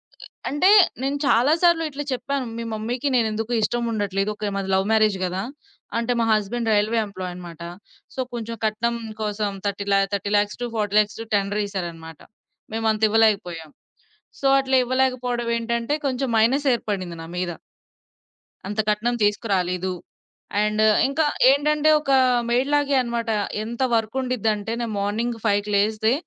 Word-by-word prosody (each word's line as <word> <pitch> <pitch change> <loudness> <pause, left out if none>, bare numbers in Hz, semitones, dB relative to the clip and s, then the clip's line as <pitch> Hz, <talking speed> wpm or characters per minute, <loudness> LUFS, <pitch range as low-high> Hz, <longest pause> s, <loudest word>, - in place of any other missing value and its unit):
అ - - -53 0.3
అంటే, 295 +7 +2 0.3
నేను 275 +2 -1
చాలా 270 +3 +4
సార్లు 340 -2 +4
ఇట్లా 290 0 -5
చెప్పాను. 270 +1 -2
మీ 235 - -4
మమ్మీకి 240 +5 -3
నేను 235 -3 +3
ఎందుకో 225 +2 -4
ఇష్టముండట్లేదు. 210 -4 -1
ఓకె. 210 -1 -3
మాది 195 -1 -3
లవ్ 190 +1 +2
మ్యారేజ్ 215 -3 +3
కదా! 185 +1 -2 0.6
అంటే 235 +1 -1
మా 230 - +2
హస్బెండ్ 225 +2 -1
రైల్వే 215 +2 +2
ఎంప్లాయన్నమాట. 180 -4 -8 0.5
సో, - - -8
కొంచెం 230 -1 -4
కట్నం 235 +2 0 0.2
కోసం 210 -1 -1 0.2
థర్టీ 200 0 -3
ల్యా 195 - +4
30,00,000-40,00,000 210 +1 0
టు - - -6
టెండరేసారన్నమాట. 195 -6 -3 0.5
మేమంత 220 -1 0
ఇవ్వలేకపోయాం. 200 -7 +1 0.7
సో, 275 - -1
అట్లా 265 -1 +2
ఇవ్వలేకపోవడం 250 -2 0
ఏంటంటే, 235 +4 -1
కొంచెం 265 0 -1
మైనస్ 270 +6 +3
ఏర్పడింది 185 -7 -4
నా 165 - -9
మీద. 180 -1 -1 1.2
అంత 210 +2 -4
కట్నం 230 +3 0
తీసుకురాలేదు, 190 -3 0 0.7
అండ్ 215 0 +1 0.2
ఇంకా 295 +3 +1 0.3
ఏంటంటే, 300 +2 +2
ఒక 275 - -2 0.4
మెయిడ్ 250 +3 +1
లాగే 285 -1 +2
అన్నమాట. 235 -1 -3 0.3
ఎంత 235 +3 -6
వర్కుండిదంటే, 225 -2 -1
నేను 230 -2 -3
మార్నింగ్ 225 +4 -1
5కి 205 0 +1
లేస్తే, 220 +3 +2
220 Hz, 130 wpm, -23 LUFS, 205-245 Hz, 1.2 s, చాలా